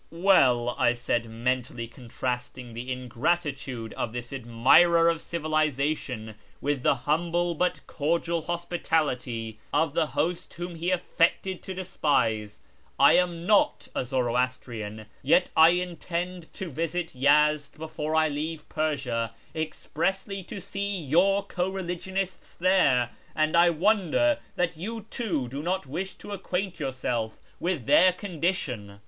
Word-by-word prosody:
" - - -37
Well," 140 -10 +4
I 120 - +4
said, 120 -1 -1
mentally 120 0 -2
contrasting 125 0 -5
the 120 +3 -5
ingratitude 130 -1 -2
of 115 - -3
this 120 +1 -6
admirer 135 +8 +5
of 165 -1 -1
civilisation 150 -7 -1 0.3
with 145 -2 -1
the 140 - +3
humble 170 +3 +1
but 180 +2 -1
cordial 165 +2 0
hospitality 150 -10 -2
of 160 -3 +2
the 160 -1 +2
host 170 +3 -2
whom 175 0 -5
he 170 +2 -2
affected 180 +1 +1
to 190 - -6
despise, 115 - 0 0.2
" - - -35
I - - +7
am 175 -2 +1
not 205 +1 +3
a - - -1
Zoroastrian, 120 -4 -2 0.2
yet 165 +7 +3
I 160 +1 +8
intend 175 0 -3
to 185 -4 -5
visit 165 +4 -2
Yezd 145 +3 +3
before 155 0 -3
I 160 0 +4
leave 155 +1 -4
Persia, 125 -8 -1 0.2
expressly 190 +5 -2
to 200 - -7
see 200 +1 -3
your 180 +6 +3
co 185 -2 -2
religionists 190 0 -4
there, 140 -10 +3 0.2
and 155 +1 +2
I 170 +1 +6
wonder 205 - +2 0.2
that 175 -1 0
you 220 +5 -5
too 170 - -1
do 135 +4 -5
not 185 +2 -1
wish 175 +8 -4
to - - -11
acquaint 190 -2 -3
yourself 125 -5 -2 0.2
with 170 -9 -1
their 185 +9 +6
condition." 165 - -3
155 Hz, 135 wpm, -27 LUFS, 125-175 Hz, 0.3 s, I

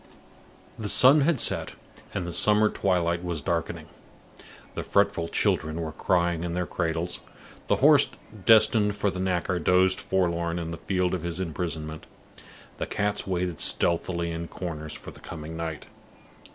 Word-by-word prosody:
The 105 -2 -3
sun 135 +7 +7
had 150 -1 +2
set, - - +1 0.4
and 90 - -3
the 85 - -5
summer 105 +2 +3
twilight 85 -3 0
was 85 -3 -3
darkening. 85 +3 -3 0.9
The - - -4
fretful 100 -4 +1
children 80 0 0
were 80 -1 -3
crying 85 0 0
in 85 -1 -3
their 90 0 -1
cradles; 85 0 -2 0.5
the - - +3
horse - - +5 0.4
destined 110 -2 +5
for 100 -1 0
the 90 - -6
knacker 90 -2 -1
dozed 95 +2 +3
forlorn 85 -2 0
in 85 -1 -4
the 85 - -5
field 90 -2 -1
of 90 - -2
his 85 +1 -4
imprisonment; 80 -3 -4 0.7
the - - -3
cats 105 0 -2
waited 90 -3 -2
stealthily 85 0 +1
in 85 0 -5
corners 80 -4 -6
for - - -7
the - - -15
coming 80 -1 -8
night. 80 -2 -5
85 Hz, 150 wpm, -26 LUFS, 85-95 Hz, 0.9 s, sun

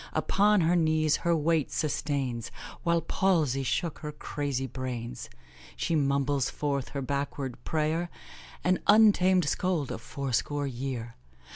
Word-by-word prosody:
Upon 205 0 +3
her 170 +2 +3
knees 155 -2 +3
her 170 0 +1
weight 160 -1 +1
sustains, 140 -6 -2 0.3
While 170 0 +2
palsy 160 -6 +1
shook 160 +5 -1
her 150 -2 -5
crazy 145 -3 -3
brains; 125 -1 -5 0.5
She - - -1
mumbles 140 -2 +1
forth 140 -3 -2
her 140 -1 -4
backward 140 -1 -3
prayer 160 +2 0 0.5
An 185 +1 +2
untamed 195 -4 +5
scold 170 -3 0
of - - -5
fourscore 140 +3 -2
year. 125 -3 -5
145 Hz, 125 wpm, -28 LUFS, 135-170 Hz, 0.5 s, untamed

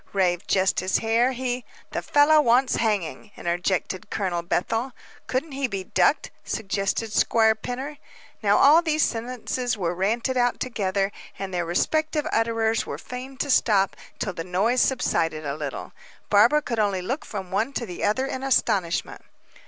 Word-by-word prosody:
raved 180 -3 +1
Justice 190 -1 +2
Hare. 230 +3 +2
"He 250 0 -3
" - - -26
"The - - -2
fellow 300 +1 +5
wants 250 0 +3
hanging," 210 -3 -1
interjected 180 +2 -2
Colonel 180 -4 -1
Bethel. 225 +9 -1 0.3
"Couldn't 270 +5 -2
he 270 -1 -1
be 195 -4 -4
ducked?" - - +1
suggested 210 +1 -2
Squire 220 0 +4
Pinner. 260 +7 -6 0.4
Now 205 -1 +3
all 305 +4 +7
these 310 -2 +1
sentences 245 +1 -2
were 175 -3 -1
ranted 230 +8 0
out 245 -1 +1
together, 200 -5 -1 0.3
and 195 -1 -5
their 175 -2 -1
respective 310 - 0
utterers 225 0 +1
were - - -6
fain 255 +2 -8
to 285 +1 -1
stop 195 -6 +3 0.2
till 195 - -3
the 165 - -5
noise 200 +8 +1
subsided 165 - 0
a 140 - -2
little. 145 -3 -6 0.4
Barbara 235 +9 +5
could 235 -5 -3
only 200 -3 +1
look 265 - -3
from 195 -9 -7
one 215 +7 0
to 240 - -2
the 180 -5 -7
other 215 +6 +1
in 260 -1 -4
astonishment. 200 -10 0
225 Hz, 160 wpm, -24 LUFS, 190-255 Hz, 0.4 s, all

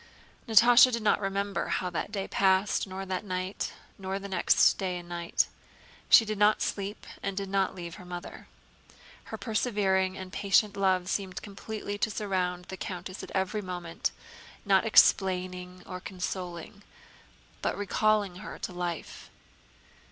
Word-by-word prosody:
Natásha 235 +3 +7
did 235 -2 -2
not 210 - +3
remember 200 0 -1
how 180 -1 -1
that 175 - -3
day 195 -2 -3
passed 195 +1 +2
nor 190 +1 -6
that 185 0 -3
night, 185 0 -3 0.3
nor 190 0 -3
the 200 0 -7
next 185 -3 +4
day 185 -2 -2
and 175 0 -9
night. 170 -1 0 0.6
She 225 - +8
did 215 -1 -3
not 210 +1 +4
sleep 200 +1 -4 0.2
and 195 -1 -3
did 195 -1 -3
not 195 -1 +1
leave 170 -2 -7
her - - -11
mother. 175 -1 -8 0.8
Her - - -6
persevering 195 -5 0
and 185 -1 -8
patient 200 +1 +2
love 190 -2 +2
seemed 190 -1 -3
completely 205 0 -6
to 220 - +1
surround 185 -4 -2
the 190 - -8
countess 185 0 -6
every 190 +3 0
moment, 175 -3 -3 0.6
not 195 +1 +3
explaining 180 -3 +3
or 185 - -6
consoling, 180 0 -6 0.8
but - - -1
recalling 205 -1 +1
her 210 - -8
to - - -5
life. 175 -2 -5
190 Hz, 145 wpm, -29 LUFS, 180-205 Hz, 0.8 s, She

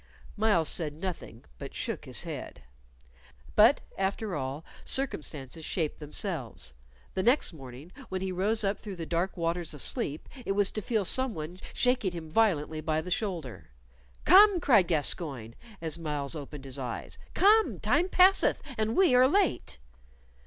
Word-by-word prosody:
Myles 205 -7 +2
said 150 -4 0
nothing, 165 -9 -6
but - - -8
shook - - -3
his - - -3
head. - - -7 0.9
But, 225 +7 +6 0.2
after 195 +1 -1
all, 135 +2 -4 0.2
circumstances 155 - -3
shape 155 -1 -2
themselves. 150 - -5 0.4
The - - 0
next 245 - +2
morning 135 +2 -11 0.2
when 190 - -2
he 190 0 -2
rose 210 +5 0
up 200 +1 0
through 205 -3 -7
the 165 -2 -5
dark 175 +4 -1
waters 170 -1 -2
of 145 - -11
sleep 150 +2 -3 0.2
it 195 - -1
was 200 0 +3
to 215 - -4
feel 215 -1 0
some 260 +4 +1
one 160 +4 -6
shaking 250 -7 +1
him 160 -2 -7
violently 160 -7 +1
by 155 0 0
the 180 +3 -8
shoulder. 155 - -3 0.6
"Come!" 390 +1 +7
cried 215 - +4
Gascoyne, 145 -7 -1 0.3
as 165 0 -4
Myles 150 -2 -3
opened 145 -1 -8
his 135 +1 -5
eyes 125 -3 -5 0.2
"come, 430 +3 +4
time 360 +3 +1
passeth, 375 +1 +5 0.2
and 220 +1 0
we 370 -8 +5
are 250 +1 +6
late." 340 - +1
175 Hz, 155 wpm, -29 LUFS, 150-220 Hz, 0.9 s, Come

